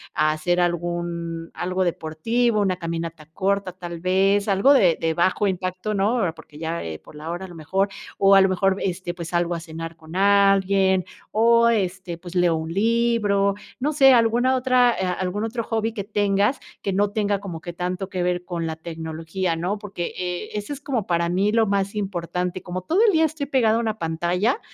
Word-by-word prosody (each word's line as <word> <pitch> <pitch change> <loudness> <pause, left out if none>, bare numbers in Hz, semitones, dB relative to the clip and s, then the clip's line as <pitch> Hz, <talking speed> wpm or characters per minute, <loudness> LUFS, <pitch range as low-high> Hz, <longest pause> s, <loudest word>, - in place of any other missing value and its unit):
a 155 0 +3
hacer 175 +3 0
algún 170 -1 -2
algo 185 +1 -1
deportivo, 210 +8 0
una 185 -2 +1
caminata 165 -2 -5
corta 195 0 0
tal 175 -2 -7
vez, 195 +3 +2
algo 200 +7 +4
de 180 - +4
de 165 0 0
bajo 185 +5 +1
impacto, 185 +2 -2
¿no?, 210 +3 +1
eh, 165 - -3
porque, 150 -2 -15
ya, 165 +2 -3
eh, 80 -1 -6
por - - -16
la 155 +2 -7
hora 175 +2 -5
a - - -9
lo 175 - -11
mejor, 190 +6 0 0.3
o 195 0 +6
a 195 - +8
lo 190 - +5
mejor, 190 +1 +1
este, 180 -1 -3
pues, 170 -2 -7
salgo 175 0 0
a - - -4
cenar 165 0 -7
con 160 +1 -12
alguien 195 -1 +4 0.3
o, 235 +1 +4
este, 185 -5 -1
pues 175 +1 -11
leo 175 -2 +3
un 160 +1 -4
libro, 210 -2 +2 0.2
no 295 +4 0
sé, 270 -2 +7
alguna 240 +2 +3
otra, 255 -1 +4
eh, 190 - 0
algún 185 +3 -2
otro 230 +1 -2
hobby 225 0 -1
que 205 - -4
tengas, 205 +3 +1 0.2
que 195 - -2
no 205 +1 +2
tenga 205 -2 0
como 185 -5 -7
que 175 - -7
tanto 180 +2 -3
que 185 -2 -3
ver 180 0 -1
con 170 -2 -3
la 160 - -3
tecnología, 165 +2 -4
¿no?, 180 +5 -2
porque, 195 -5 -5
eh, 180 -1 -3
eso 210 +5 -5
es 280 - -9
como 245 -8 -2
para 170 -1 +1
mí 195 +4 +1
lo 225 0 +3
más 200 0 0
importante. 180 -2 -3
Como 185 0 -4
todo 335 - +1
el 420 - +5
día 320 0 +4
estoy 315 -2 -3
pegado 235 -5 +3
a 235 - 0
una 220 -1 -2
pantalla, 175 - 0
190 Hz, 205 wpm, -23 LUFS, 170-210 Hz, 0.3 s, a